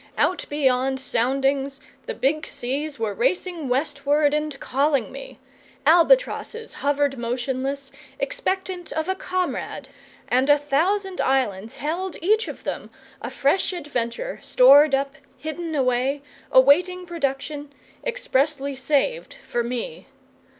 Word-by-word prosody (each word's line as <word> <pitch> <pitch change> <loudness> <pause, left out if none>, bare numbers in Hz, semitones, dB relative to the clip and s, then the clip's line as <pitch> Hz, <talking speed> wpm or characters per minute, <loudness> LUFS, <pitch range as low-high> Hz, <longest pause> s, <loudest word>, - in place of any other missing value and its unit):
Out 365 - +1
beyond 265 -2 +1
soundings 270 +2 0 0.3
the 475 - -3
big 305 0 0
seas 285 +4 -3
were 220 -3 -2
racing 325 - -1
westward 285 +2 +1
and 300 -2 -2
calling 275 -1 +1
me, - - -9 0.5
albatrosses 460 +6 +3
hovered 285 -2 0
motionless, 265 +3 -3 0.3
expectant 380 -7 -2
of 315 +1 -2
a 380 - +1
comrade, 370 -1 -3 0.4
and 260 +3 +2
a 290 - +7
thousand 360 +7 0
islands 225 -6 0
held 340 +4 -3
each 430 +6 +2
of - - -8
them - - -4 0.3
a - - -4
fresh 360 +7 +1
adventure, 295 - -3
stored 275 +3 +6
up, 275 0 -2 0.2
hidden 315 +1 -5
away, 265 +1 +1 0.3
awaiting 355 +8 +5
production, 290 -3 -3 0.3
expressly 285 - 0
saved 305 - 0
for 240 - -1
me. 250 - -5
285 Hz, 115 wpm, -23 LUFS, 265-350 Hz, 0.5 s, a